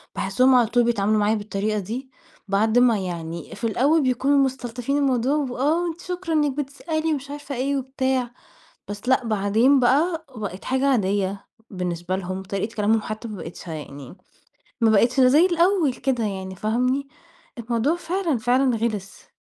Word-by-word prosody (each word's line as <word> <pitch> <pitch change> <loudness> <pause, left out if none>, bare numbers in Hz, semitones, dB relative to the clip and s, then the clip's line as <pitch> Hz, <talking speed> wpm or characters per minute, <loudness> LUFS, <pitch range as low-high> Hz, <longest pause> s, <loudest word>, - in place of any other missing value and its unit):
باحسهم 255 +7 +3
على 240 -3 +4
طول 240 +2 +2
بيتعاملوا 215 -2 +1
معايا 210 +1 +2
بالطريقة 210 0 -2
دي 240 +7 -6 0.4
بعد 215 +4 +2
ما 245 -3 +4
يعني 170 -3 -6
في - - -14
الأول 280 +8 +2
بيكونوا 265 +3 +2
مستلطفين 255 +1 -3
الموضوع 270 0 +1
وآه 290 +4 0
وأنتِ 340 0 -4
شكرًا 360 -2 -4
إنِك 295 -2 +2
بتسألي 315 +3 -2
ومش 280 -1 -5
عارفة 290 -1 -6
إيه 275 +3 0
وبتاع، 260 -2 -1 0.6
بس 205 +5 -6
لأ 260 -1 +3
بعدين 220 +6 +3
بقي 315 +7 +2
بقت 200 -4 -6
حاجة 265 +2 +1
عادية 200 -5 0 0.2
بالنسبة 180 -1 -3
لهم، 190 0 -4
طريقة 200 +3 -4
كلامهم 215 +1 +2
حتى 215 +2 -6
ما 210 -3 -7
بقتش 170 +1 -9
يعني 145 -2 -8 0.7
ما 225 -1 +4
بقتش 235 +5 +3
زي 285 +8 +6
الأول 345 -4 +2
كده 250 -2 -1
يعني 190 -2 -4
فاهمني؟ 250 +6 0 0.5
الموضوع 235 +6 0
فعلًا 345 -5 -1
فعلًا 245 +2 +2
غلس. 215 -4 -4
245 Hz, 155 wpm, -23 LUFS, 205-275 Hz, 0.7 s, زي